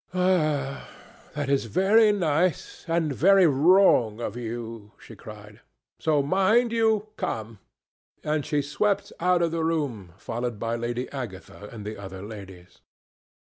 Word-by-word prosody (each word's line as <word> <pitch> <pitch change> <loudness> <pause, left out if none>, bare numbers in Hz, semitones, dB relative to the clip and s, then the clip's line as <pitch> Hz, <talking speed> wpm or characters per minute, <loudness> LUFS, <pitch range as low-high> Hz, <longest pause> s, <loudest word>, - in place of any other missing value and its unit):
"Ah! 155 -7 0 0.5
that 145 -1 -2
is 140 -3 +1
very 205 - +4
nice, 175 -3 -1
and 165 -3 0
very 195 +6 +5
wrong 145 - +4
of 120 - -4
you," 115 -2 -7
she 115 - -13
cried; 105 0 -12 0.4
"so 150 -3 +1
mind 215 - +2
you 220 -2 +1
come"; 110 -1 -4 0.6
and 150 -1 -1
she 145 0 -1
swept 195 +8 -1
out 180 0 +2
of 165 - 0
the 165 -1 -2
room, 135 - -2
followed 120 +1 -4
by 115 +2 -2
Lady 120 +2 -3
Agatha 105 -5 -8
and 110 -3 -9
the 105 +1 -6
other 95 -1 -8
ladies. 95 -4 -11
140 Hz, 135 wpm, -25 LUFS, 110-175 Hz, 0.6 s, very